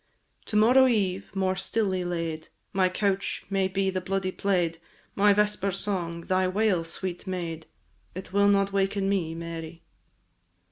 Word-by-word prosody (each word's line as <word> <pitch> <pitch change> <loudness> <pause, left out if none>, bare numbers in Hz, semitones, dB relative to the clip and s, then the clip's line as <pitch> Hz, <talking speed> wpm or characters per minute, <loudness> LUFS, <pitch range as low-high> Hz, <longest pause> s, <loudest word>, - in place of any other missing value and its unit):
To 210 - -5
morrow 250 +5 +6
eve, 195 -5 0
more 190 -1 +1
stilly 190 -1 -1
laid, 165 -2 -3 0.3
My 185 -1 +3
couch 195 +1 -1
may 195 -1 +2
be 190 0 0
the 185 0 -2
bloody 190 0 -1
plaid, 175 -4 0 0.3
My 205 +1 +4
vesper 210 -1 +2
song, 180 -3 -3
thy 185 +2 +1
wail, 190 -2 +1
sweet 180 +3 -5
maid! 170 -3 -4 0.5
It 185 0 -8
will 200 0 +4
not 200 -1 +3
waken 195 0 +1
me, 175 -5 0
Mary! 165 0 -7
190 Hz, 145 wpm, -27 LUFS, 175-200 Hz, 0.5 s, morrow